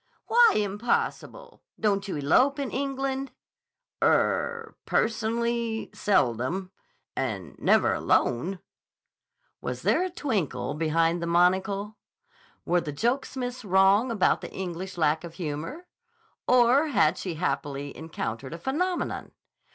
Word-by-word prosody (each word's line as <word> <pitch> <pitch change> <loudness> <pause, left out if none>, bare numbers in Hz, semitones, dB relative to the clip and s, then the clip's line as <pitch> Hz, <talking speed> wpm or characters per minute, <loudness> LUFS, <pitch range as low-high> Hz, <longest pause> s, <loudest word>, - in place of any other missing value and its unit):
"Why 475 0 +6
impossible? 210 - -2 0.2
Don't 200 -2 +1
you 195 - -3
elope 250 - +3
in 280 -3 -3
England?" 270 0 -2 0.7
"Er—personally, 235 - 0
seldom. 185 - 0 0.4
And 105 -9 -3
never - - +3
alone." 170 +10 +1 1.0
Was - - -5
there - - +3
a 370 - -2
twinkle 180 - -2
behind 165 +2 +1
the 170 - -2
monocle? 190 +4 +1 0.7
Were 175 +1 +2
the 150 - -5
jokesmiths 245 - -2
wrong 195 +4 +4
about 220 -5 +2
the - - -7
English 185 0 -5
lack 155 0 +2
of 170 -1 -9
humor? 170 - -5 0.6
Or 250 +5 +5
had 195 - +2
she, 180 -4 -4
happily, 140 -3 -3
encountered 140 -4 -5
a - - -7
phenomenon? 345 - -2
195 Hz, 110 wpm, -27 LUFS, 165-250 Hz, 1.0 s, Why